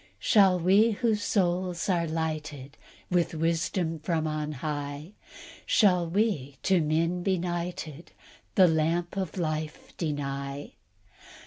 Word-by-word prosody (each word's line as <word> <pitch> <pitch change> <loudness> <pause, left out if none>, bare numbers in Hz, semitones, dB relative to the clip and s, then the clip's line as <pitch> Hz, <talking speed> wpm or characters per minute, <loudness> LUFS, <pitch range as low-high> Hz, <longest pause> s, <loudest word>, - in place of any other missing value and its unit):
"Shall 185 - +4
we, 200 +6 +4
whose 220 -1 0
souls 180 -3 0
are 175 -3 +1
lighted 155 -3 -4 0.4
With 175 -2 +1
wisdom 165 +1 -1
from 160 0 -1
on 155 -1 -2
high, 145 +2 -5 0.5
Shall 180 -5 +3
we 165 - 0
to 190 -3 +3
men 165 +3 0
benighted 175 -4 -3 0.4
The 185 -2 +7
lamp 165 +2 0
of 190 -3 -3
life 155 -2 -4
deny? 140 -2 -4
165 Hz, 110 wpm, -28 LUFS, 155-180 Hz, 0.5 s, The